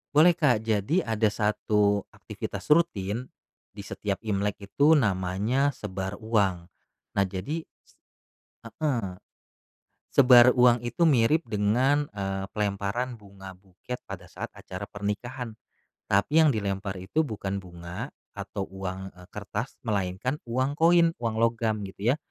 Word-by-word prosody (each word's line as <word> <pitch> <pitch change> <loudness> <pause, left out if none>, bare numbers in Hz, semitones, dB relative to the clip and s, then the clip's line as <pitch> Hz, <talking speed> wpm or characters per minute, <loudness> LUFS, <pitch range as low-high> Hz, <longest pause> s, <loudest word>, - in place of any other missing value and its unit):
Boleh, 160 +4 +8
Kak, 140 -10 +2
jadi 110 - +1
ada 110 -1 +1
satu 105 -1 +1
aktivitas - - -7
rutin 120 - +2 0.5
di - - -7
setiap 100 -2 -3
Imlek 100 -1 -1
itu 145 +10 +4
namanya 110 - +1
sebar 95 -1 -5
uang, 95 -6 0 0.4
nah 100 - +2
jadi 105 - -4 0.2
s - - -26 0.8
heeh. 150 +6 -1 1.2
Sebar 125 -2 +8
uang 120 -1 +5
itu 120 +8 +1
mirip 150 +3 +3
dengan, 125 +8 +1
eee, 95 -1 -4
pelemparan 105 +4 -2
bunga 100 -3 -12
buket 95 +6 -9
pada - - -9
saat - - -7
acara 90 +2 -9
pernikahan, 110 +4 -4 0.5
tapi 100 +11 +3
yang 155 -4 +5
dilempar 100 -2 -2
itu 155 +12 0
bukan 100 -4 -3
bunga 85 -1 -8 0.2
atau 95 - -6
uang, 95 0 -5
eee, 90 0 -16
kertas, 105 +4 -4
melainkan 105 +4 -1
uang 130 +5 -1
koin, 170 0 +5
uang 115 -2 -2
logam 115 -1 +1
gitu 100 +5 0
ya, - - -5
105 Hz, 130 wpm, -27 LUFS, 100-125 Hz, 1.2 s, Boleh